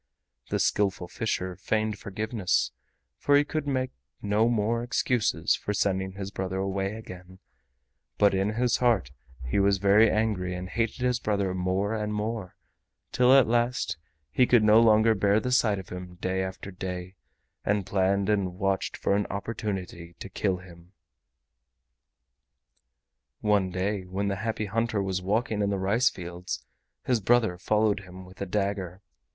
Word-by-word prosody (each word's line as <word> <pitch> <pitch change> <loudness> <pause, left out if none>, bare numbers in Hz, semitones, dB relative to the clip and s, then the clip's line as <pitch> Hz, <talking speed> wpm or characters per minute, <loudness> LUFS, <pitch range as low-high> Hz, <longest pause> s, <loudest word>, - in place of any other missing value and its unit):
The - - 0
Skillful 95 -3 +1
Fisher 95 -3 -2
feigned 110 +2 -1
forgiveness, 105 -1 -1 0.5
for 145 0 +4
he 145 - +4
could 155 -1 -3
make 130 -2 -1 0.3
no 105 +3 +2
more 115 0 +1
excuses 120 -1 +1
for 105 - -3
sending 95 -1 0
his 100 0 -6
brother 95 -1 -3
away 95 +1 -2
again, 95 -4 -10 0.8
but 100 -1 +4
in 95 +2 0
his 120 +1 +1
heart 115 - +2 0.3
he 65 +10 0
was 100 0 +3
very 100 +3 +5
angry 105 -5 0
and 90 +1 -5
hated 115 +3 -2
his 125 -1 +1
brother 100 -4 0
more 95 +3 0
and 105 -1 -2
more, 105 -3 -3 0.6
till 125 0 +4
at 135 -2 +7
last 120 -4 0 0.4
he 125 - +3
could 120 -3 +5
no 110 +1 +6
longer 110 0 +5
bear 100 0 +3
the 125 +2 -3
sight 110 -5 +3
of 95 -2 -8
him 90 0 -8
day 95 +1 -2
after 95 +1 -6
day, 90 0 -6 0.5
and 105 -2 0
planned 95 +1 +1
and 100 -4 0
watched 95 -1 -1
for 100 - +1
an 100 0 0
opportunity 95 -5 -5
to 100 - -8
kill 95 -1 -1
him. 90 0 -15 2.5
One 105 -3 +2
day 95 +1 -2
when 100 +2 -2
the 100 - -2
Happy 110 +1 -2
Hunter 115 +1 -1
was 95 -1 -2
walking 105 +2 0
in 100 - +1
the 100 - 0
rice 100 +7 +2
fields 90 0 -6 0.4
his 125 -4 +1
brother 110 -4 +2
followed 105 +1 +2
him 95 -1 -11
with 95 +1 -15
a 100 - -2
dagger. 100 -1 -2
100 Hz, 155 wpm, -27 LUFS, 95-110 Hz, 2.5 s, at